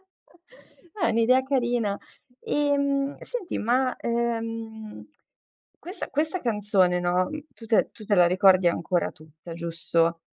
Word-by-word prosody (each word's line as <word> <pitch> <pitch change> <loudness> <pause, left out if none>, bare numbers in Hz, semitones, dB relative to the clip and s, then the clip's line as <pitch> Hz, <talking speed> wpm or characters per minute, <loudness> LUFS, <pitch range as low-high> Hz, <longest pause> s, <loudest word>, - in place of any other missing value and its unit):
eh, 380 0 -21
è - - +4
un'idea 230 +3 +4
carina. 240 -6 0 0.4
Ehm, 280 -1 0
senti, 465 -8 -5
ma, 255 +3 +1
ehm, 225 -2 -4 0.7
questa 360 +4 -7
questa 315 +5 -1
canzone, 205 -6 +2
no, 180 +1 +1 0.2
tu 230 - -13
te 225 - +3
la - - +4
tu 215 - -13
te 205 - +1
la 180 -2 +6
ricordi 185 0 +5
ancora 170 +1 0
tutta, 160 +2 -13
giusto? 165 0 -1
225 Hz, 130 wpm, -25 LUFS, 180-275 Hz, 0.7 s, la